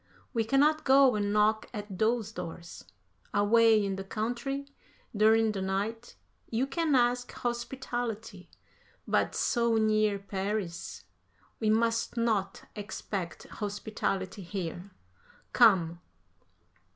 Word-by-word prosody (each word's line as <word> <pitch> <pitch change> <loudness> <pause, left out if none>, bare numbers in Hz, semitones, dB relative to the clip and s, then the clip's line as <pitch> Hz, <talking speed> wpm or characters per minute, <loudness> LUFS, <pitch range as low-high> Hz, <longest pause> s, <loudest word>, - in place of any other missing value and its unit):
We 230 -2 +1
cannot 290 +6 +3
go 265 -2 +5
and 205 -1 0
knock 210 +1 +2
at 205 -3 -6
those 220 -1 +1
doors. 170 - -8 0.5
Away 220 +1 +5
in 195 -1 -2
the 195 - -4
country, 245 +7 -3 0.5
during 220 +1 +4
the 195 -2 -4
night, 205 +5 -3 0.3
you 235 +3 0
can 300 +1 0
ask 245 0 +2
hospitality, 240 -5 -4 0.6
but - - +1
so 235 -1 +1
near 215 -2 +2
Paris... 195 - -4 0.6
we 220 - +1
must 230 +2 +1
not 215 -4 0
expect 205 -3 -5
hospitality 205 -2 -3
here. 180 0 -5 0.6
Come." 180 -8 +4
215 Hz, 105 wpm, -29 LUFS, 195-235 Hz, 0.6 s, go